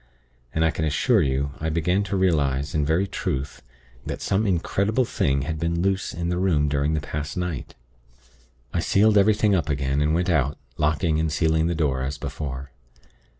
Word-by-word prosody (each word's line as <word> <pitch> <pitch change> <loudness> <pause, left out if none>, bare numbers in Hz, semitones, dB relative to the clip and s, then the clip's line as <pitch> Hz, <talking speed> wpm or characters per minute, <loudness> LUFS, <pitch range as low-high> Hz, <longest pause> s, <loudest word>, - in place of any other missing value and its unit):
And 80 +1 +1
I 80 - +3
can 80 - -3
assure 75 -2 +2
you, 70 +1 0
I 80 - -1
began 85 +5 +1
to 100 +1 -2
realize, 70 -7 +1
in 75 - +1
very 80 +6 +2
truth, 70 -7 -4 0.4
that - - -5
some 100 +3 0
incredible 100 +6 +1
thing 70 -9 0
had 80 +2 -3
been 85 +1 -1
loose 95 0 0
in 85 0 -3
the 90 0 -1
room 80 -6 +2
during 70 +2 0
the - - 0
past 75 +1 -5
night. 90 -7 -4 1.0
I 85 - 0
sealed 105 +5 +3
up - - +7
everything 105 0 +3
again, 70 -5 0
and 75 +2 +2
went 90 +1 +1
out, 70 -3 +1 0.2
locking 80 +1 +1
and 80 -1 0
sealing 80 0 +2
the 85 - -1
door, 70 -5 0
as 70 +2 -3
before. 70 -2 -6
80 Hz, 185 wpm, -24 LUFS, 70-90 Hz, 1.0 s, up